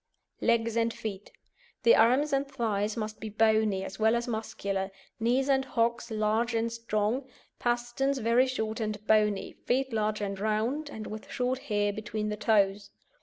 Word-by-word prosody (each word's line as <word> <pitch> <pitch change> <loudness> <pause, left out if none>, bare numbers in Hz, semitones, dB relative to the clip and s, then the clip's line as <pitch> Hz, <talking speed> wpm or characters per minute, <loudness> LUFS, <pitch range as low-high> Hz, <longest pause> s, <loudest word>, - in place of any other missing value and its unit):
LEGS 230 -1 +2
AND 230 0 +2
FEET 205 -2 -6 0.5
The 470 - +7
arms 275 +5 +4
and 275 +1 +1
thighs 215 -4 -1
must 215 -1 -4
be 220 - -5
bony, 215 -2 +2
as 195 - -7
well 220 +1 +4
as 235 +1 -1
muscular, 200 -4 -3 0.3
knees 245 +4 +2
and 270 -1 +3
hocks 235 -2 0
large 220 +2 0
and 230 0 0
strong, 230 +3 -1 0.3
pasterns 240 +3 0
very 240 +2 +3
short 220 -3 -2
and 215 -1 -3
bony, 210 -2 +2
feet 265 0 +1
large 215 -1 0
and 200 -2 -3
round, 225 +8 -1
and 220 -6 -7
with 215 0 -8
short 250 +1 -1
hair 205 -1 +1
between 215 0 -3
the 210 - -2
toes. 205 -2 +2
220 Hz, 165 wpm, -29 LUFS, 210-240 Hz, 0.5 s, The